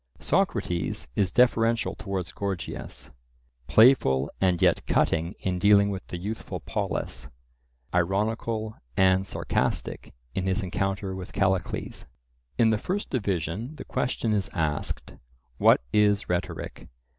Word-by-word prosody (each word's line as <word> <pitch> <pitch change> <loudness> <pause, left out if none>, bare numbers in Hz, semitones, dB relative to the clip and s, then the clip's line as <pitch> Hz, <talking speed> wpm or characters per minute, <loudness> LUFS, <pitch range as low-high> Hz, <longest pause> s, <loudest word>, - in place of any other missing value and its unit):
Socrates 85 -7 0
is 95 -3 +1
deferential 115 -1 +3
towards 95 -4 -4
Gorgias, 100 -3 -5 0.6
playful 90 - +5
and 90 -2 +3
yet - - +3
cutting 85 +4 +1
in 90 -1 -1
dealing 100 +1 +5
with 95 - -6
the 90 - -5
youthful 105 +5 -5
Polus, 65 0 -3 0.6
ironical 110 +4 0 0.2
and 95 0 +4
sarcastic - - -2 0.2
in 95 +3 -2
his 95 +2 0
encounter 95 +1 -2
with 95 -1 -7
Callicles. 95 -2 -1 0.5
In 115 -2 +5
the 110 - +1
first 200 - -3
division 105 - -2
the - - -9
question 115 -3 -1
is 100 -2 0
asked—What 60 -7 0
is 105 -1 +3
rhetoric? 90 -1 -3
95 Hz, 115 wpm, -27 LUFS, 90-110 Hz, 0.6 s, playful